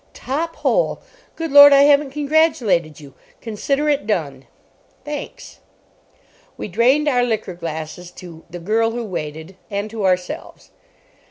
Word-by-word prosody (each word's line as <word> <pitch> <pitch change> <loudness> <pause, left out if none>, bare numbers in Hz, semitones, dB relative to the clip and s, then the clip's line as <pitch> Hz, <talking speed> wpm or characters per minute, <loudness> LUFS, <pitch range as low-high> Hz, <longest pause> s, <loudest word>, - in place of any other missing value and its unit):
"Top 320 +6 -4
hole. - - 0 0.4
Good 325 -2 -4
Lord, 285 0 +10
I 280 0 +6
haven't 285 0 +4
congratulated 265 - +1
you! 140 -3 -14 0.3
Consider 275 +7 -2
it 290 -6 0
done." 140 -10 -3 0.6
"Thanks." 295 -1 -8 1.0
We - - -5
drained 255 +10 +2
our 250 -4 +2
liqueur 220 -6 -2
glasses 165 +1 -7
to 170 -3 -12
The 175 - -8
Girl 220 +6 0
who 235 +1 -4
Waited 160 -2 -7
and 205 +1 -4
to 220 -2 -5
ourselves. 180 -1 -3
220 Hz, 135 wpm, -20 LUFS, 175-285 Hz, 1.0 s, Lord